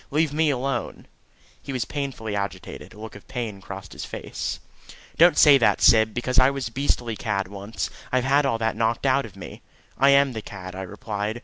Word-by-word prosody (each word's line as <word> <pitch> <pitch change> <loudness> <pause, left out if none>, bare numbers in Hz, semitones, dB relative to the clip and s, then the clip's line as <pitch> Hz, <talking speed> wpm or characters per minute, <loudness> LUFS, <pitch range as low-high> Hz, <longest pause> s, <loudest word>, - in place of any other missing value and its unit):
Leave 150 0 +1
me 155 0 +2
alone." 135 -2 -2 0.6
He - - -7
was 130 -3 -2
painfully 135 -7 -4
agitated. 100 -2 -5
A - - -14
look 110 -1 -9
of 105 - -13
pain 110 -6 -5
crossed 95 0 -9
his - - -7
face. - - -5 0.6
"Don't 170 -1 +6
say 145 -3 +8
that, 115 - +3
Syb, 110 -1 +5
because 125 +1 +1
I 130 +1 +6
was 135 -4 -3
a - - -21
beastly 120 -3 -1
cad 100 -1 -2
once: 100 +3 -5 0.2
I've 130 -1 +2
had 140 +2 +3
all 135 -5 +1
that 115 0 -1
knocked 115 +3 0
out 135 -2 +2
of 100 - -17
me." 95 - -10 0.4
"I 140 - +6
am 140 -1 +5
the 110 - -5
cad," 95 -3 -9
I 95 - -5
replied. 105 +3 -4
115 Hz, 205 wpm, -24 LUFS, 105-135 Hz, 0.6 s, say